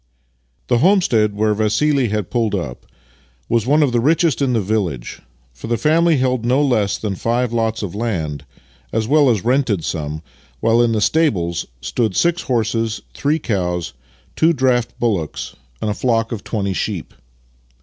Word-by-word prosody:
IV -, -, -42 dB
The 120 Hz, -, +4 dB
homestead 125 Hz, -, +3 dB
where 105 Hz, +1 st, +2 dB
Vassili 120 Hz, +6 st, +1 dB
had 105 Hz, -3 st, -3 dB
pulled 115 Hz, -4 st, 0 dB
up 65 Hz, -10 st, -5 dB, 0.6 s
was 115 Hz, 0 st, 0 dB
one 150 Hz, +3 st, +4 dB
of 140 Hz, -, +1 dB
the 120 Hz, -, +2 dB
richest 155 Hz, +1 st, +2 dB
in 130 Hz, -2 st, +2 dB
the 115 Hz, -, +2 dB
village, 95 Hz, -, -2 dB, 0.3 s
for 65 Hz, -, -9 dB
the 120 Hz, 0 st, 0 dB
family 160 Hz, +5 st, +3 dB
held 130 Hz, -2 st, 0 dB
no 125 Hz, +3 st, +2 dB
less 110 Hz, -7 st, +1 dB
than 105 Hz, -3 st, -3 dB
five 120 Hz, +4 st, -1 dB
lots 115 Hz, -1 st, -1 dB
of 95 Hz, -, -4 dB
land, 85 Hz, -, -3 dB, 0.5 s
as 110 Hz, -1 st, -1 dB
well 145 Hz, 0 st, +4 dB
as 110 Hz, -5 st, 0 dB
rented 125 Hz, -, +1 dB
some, 75 Hz, 0 st, -4 dB, 0.4 s
while 115 Hz, +1 st, +3 dB
in 120 Hz, -1 st, +2 dB
the 110 Hz, -, 0 dB
stables 100 Hz, -, +1 dB
stood 105 Hz, -, -1 dB
six 170 Hz, 0 st, +2 dB
horses, 115 Hz, -2 st, -1 dB
three 150 Hz, +2 st, 0 dB
cows, 90 Hz, -, -2 dB, 0.4 s
two 165 Hz, +1 st, +3 dB
draught 130 Hz, -4 st, +1 dB
bullocks, 100 Hz, -10 st, -2 dB, 0.3 s
and 105 Hz, -, 0 dB
a -, -, 0 dB
flock 115 Hz, 0 st, 0 dB
of 110 Hz, -4 st, -5 dB
twenty 100 Hz, -4 st, -2 dB
sheep. 95 Hz, -1 st, -3 dB
115 Hz, 170 wpm, -19 LUFS, 100-130 Hz, 0.6 s, The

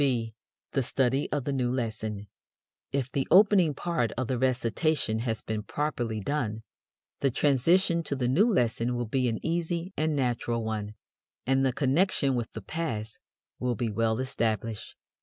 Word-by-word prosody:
(b) 120 Hz, -5 st, +1 dB, 0.4 s
The 135 Hz, -, +1 dB
Study 130 Hz, +2 st, 0 dB
of 145 Hz, -3 st, 0 dB
the 140 Hz, -, -2 dB
New 125 Hz, -2 st, 0 dB
Lesson. 110 Hz, -4 st, -3 dB, 0.6 s
If 135 Hz, -2 st, -1 dB
the 135 Hz, -, -1 dB
opening 185 Hz, -5 st, +6 dB
part 160 Hz, -11 st, -1 dB
of 130 Hz, -, 0 dB
the 125 Hz, -1 st, -1 dB
recitation 130 Hz, 0 st, +1 dB
has 115 Hz, -1 st, -2 dB
been 110 Hz, -1 st, -3 dB
properly 120 Hz, -3 st, -2 dB
done, 110 Hz, -3 st, -2 dB, 0.6 s
the 140 Hz, -, +2 dB
transition 165 Hz, +7 st, +3 dB
to 140 Hz, -, -2 dB
the 125 Hz, -2 st, 0 dB
new 195 Hz, -, +4 dB
lesson 120 Hz, -, +1 dB
will 120 Hz, 0 st, -1 dB
be 125 Hz, +3 st, 0 dB
an 110 Hz, -, -1 dB
easy 170 Hz, +2 st, -1 dB
and 155 Hz, 0 st, 0 dB
natural 120 Hz, -3 st, 0 dB
one, 105 Hz, -1 st, -3 dB, 0.5 s
and 135 Hz, +1 st, +2 dB
the 135 Hz, -, +3 dB
connection 140 Hz, +2 st, +2 dB
with 120 Hz, -2 st, -2 dB
the 110 Hz, -, -7 dB
past 115 Hz, -10 st, -3 dB, 0.4 s
will 125 Hz, -1 st, 0 dB
be 115 Hz, 0 st, -2 dB
well 110 Hz, +1 st, +1 dB
established. 115 Hz, -4 st, -2 dB
125 Hz, 160 wpm, -28 LUFS, 115-145 Hz, 0.6 s, opening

